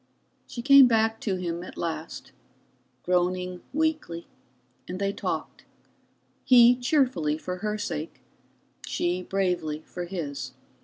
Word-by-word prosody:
She 235 - -7
came 275 -1 +9
back 225 -1 +2
to 200 -4 -1
him 175 -2 -3
at 180 - -10
last, 160 -1 -5 0.7
groaning 180 0 0
weakly, 305 - -1 0.6
and 180 - -5
they 200 +1 -1
talked, - - -4 0.8
he 245 -1 +7
cheerfully 245 - +1
for 180 +3 -5
her 210 +2 -2
sake, 160 -6 -5 0.6
she 175 +1 -1
bravely 180 -5 -1
for 175 -1 -6
his. 165 -6 -5
185 Hz, 115 wpm, -26 LUFS, 170-230 Hz, 0.8 s, came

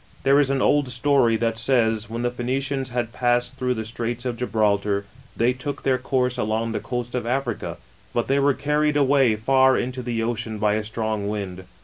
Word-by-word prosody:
There 135 - +4
:^ 145 -1 +4
an 135 -1 +1
old 145 -3 +3
story 125 -2 +3
that 115 0 -1
says, 115 -3 +2
when 115 +2 -4
the 120 - 0
Phoenicians 130 +2 -2
nad 120 -1 -2
passed 120 +1 +1
through 125 -1 0
the 110 -1 -4
Straits 120 +2 -4
of 125 -2 -1
Gibraltar, 105 -4 0 0.3
tney 120 +2 +2
took 140 +3 -5
their 130 -1 +2
course 125 -1 0
along 110 0 -1
the 110 - -2
coast 120 -1 -4
of 125 -2 -2
Africa; 125 -2 -2 0.3
but 120 - -1
tluy 140 +1 +2
were 140 -1 +3
carried 150 0 +1
away 135 -5 +4
far 130 +4 +4
into 125 +1 -3
the 120 -1 -3
iceni 110 -2 -3
by 105 0 +2
a 110 0 -1
strong 110 -1 -2
wind. 95 -3 -5
120 Hz, 200 wpm, -23 LUFS, 110-130 Hz, 0.3 s, There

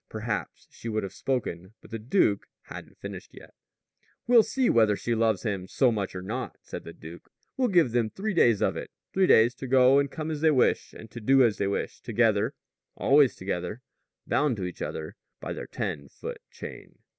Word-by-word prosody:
Perhaps - - -4
she 115 - -7
would 110 -1 -1
have 95 - -6
spoken. 110 -7 -3
But - - -17
the 115 - -4
duke 110 - +1 0.2
hadn't - - -10
finished - - -9
yet. - - -14 0.7
"We'll 240 -1 +7
see 260 +3 0
whether 110 -3 +4
she 120 - -2
loves 110 -4 +1
him 100 -4 -2
so 125 +5 +3
much 100 -4 -3
or 90 - -5
not," 120 +7 -5
said - - -8
the 85 - -7
duke. 85 +1 -12 0.3
"We'll 255 -1 +2
give 175 - +3
them 115 -2 +1
three 205 - -3
days 120 - +4
of - - +1
it - - -6 0.2
three 190 -1 +3
days 115 +2 +6
to 130 +1 -7
go 130 +1 +6
and 140 0 0
come 155 +2 -5
as 150 -2 -4
they 160 - +5
wish 135 -5 +2
and 110 - -12
to 120 - -8
do 135 +4 +5
as 115 -4 +2
they 100 - +1
wish 100 - -3
together 115 0 +1 0.4
always 140 -2 +4
together 95 +5 -4 0.4
bound 145 -6 +1
to 95 - -4
each 90 - -7
other 80 -1 -5 0.2
by - - -5
their - - -7
ten 70 -1 -4
foot - - -8
chain." - - -10
115 Hz, 205 wpm, -27 LUFS, 100-135 Hz, 0.7 s, We'll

